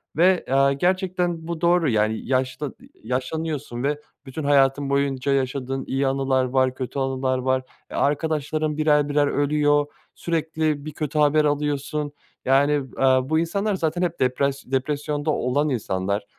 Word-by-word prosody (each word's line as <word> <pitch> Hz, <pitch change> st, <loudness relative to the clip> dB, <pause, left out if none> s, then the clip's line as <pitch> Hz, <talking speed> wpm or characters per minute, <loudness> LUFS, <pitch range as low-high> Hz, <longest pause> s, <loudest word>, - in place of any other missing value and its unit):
ve, 180 Hz, +2 st, +3 dB
aaa, 135 Hz, +1 st, +4 dB
gerçekten 180 Hz, 0 st, -1 dB
bu 170 Hz, -1 st, -4 dB
doğru, 170 Hz, -3 st, +3 dB
yani, 110 Hz, 0 st, 0 dB
yaşlı 130 Hz, +2 st, -1 dB
eee, 265 Hz, -, -16 dB, 0.2 s
yaşlanıyorsun. 135 Hz, -1 st, -3 dB
Ve 145 Hz, +1 st, 0 dB, 0.3 s
bütün 140 Hz, +3 st, -6 dB
hayatın 140 Hz, 0 st, +3 dB
boyunca 140 Hz, -1 st, 0 dB
yaşadığın 135 Hz, 0 st, -1 dB
iyi 135 Hz, +1 st, 0 dB
anılar 135 Hz, -1 st, +1 dB
var, 130 Hz, 0 st, +1 dB
kötü 130 Hz, +1 st, -4 dB
anılar 130 Hz, -1 st, 0 dB
var. 130 Hz, 0 st, 0 dB, 0.3 s
Eee, -, -, -5 dB
arkadaşların 155 Hz, +1 st, 0 dB
birer 150 Hz, -1 st, +3 dB
birer 145 Hz, 0 st, +2 dB
ölüyor, 145 Hz, 0 st, +2 dB, 0.3 s
sürekli 155 Hz, -3 st, -1 dB
bir 155 Hz, -, -5 dB
kötü 150 Hz, 0 st, -2 dB
haber 150 Hz, +1 st, +4 dB
alıyorsun, 145 Hz, 0 st, -1 dB, 0.3 s
yani, 135 Hz, +3 st, +4 dB, 0.3 s
eee, -, -, +1 dB, 0.3 s
bu 160 Hz, 0 st, +3 dB
insanlar 200 Hz, +5 st, 0 dB
zaten 170 Hz, 0 st, -1 dB
hep 170 Hz, -1 st, -1 dB
depras 135 Hz, +2 st, 0 dB
depresyonda 145 Hz, +3 st, -1 dB
olan 145 Hz, +3 st, 0 dB
insanlar. 100 Hz, -4 st, -1 dB
145 Hz, 145 wpm, -23 LUFS, 135-155 Hz, 0.3 s, aaa